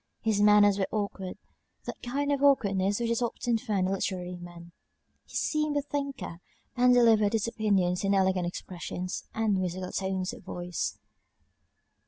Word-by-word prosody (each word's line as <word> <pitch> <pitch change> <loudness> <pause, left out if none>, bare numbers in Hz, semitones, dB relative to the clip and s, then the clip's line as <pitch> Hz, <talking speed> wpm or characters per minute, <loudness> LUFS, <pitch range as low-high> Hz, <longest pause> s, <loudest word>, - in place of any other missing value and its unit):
His 215 -3 +2
manners 205 -1 +6
were 190 - +1
awkward, 200 -3 -3 0.5
that - - -7
kind 285 +4 -1
of 280 -1 0
awkwardness 200 -8 +3
which 235 -1 0
is 235 - 0
often 235 0 0
found 200 -4 0
in 190 - 0
literary 180 -2 -3
men: 175 -1 -11 0.5
he - - -14
seemed 305 -1 0
a 285 - 0
thinker, 280 -11 -4 0.4
and 250 0 +5
delivered 225 -4 +5
his 225 0 +1
opinions 195 -6 +1
in 200 0 +2
elegant 190 -2 +2
expressions, 180 +1 -5
and 215 -3 +1
musical 185 0 -3
tones 190 -1 -2
of - - -10
voice. 175 -1 -4
200 Hz, 155 wpm, -28 LUFS, 185-235 Hz, 0.5 s, manners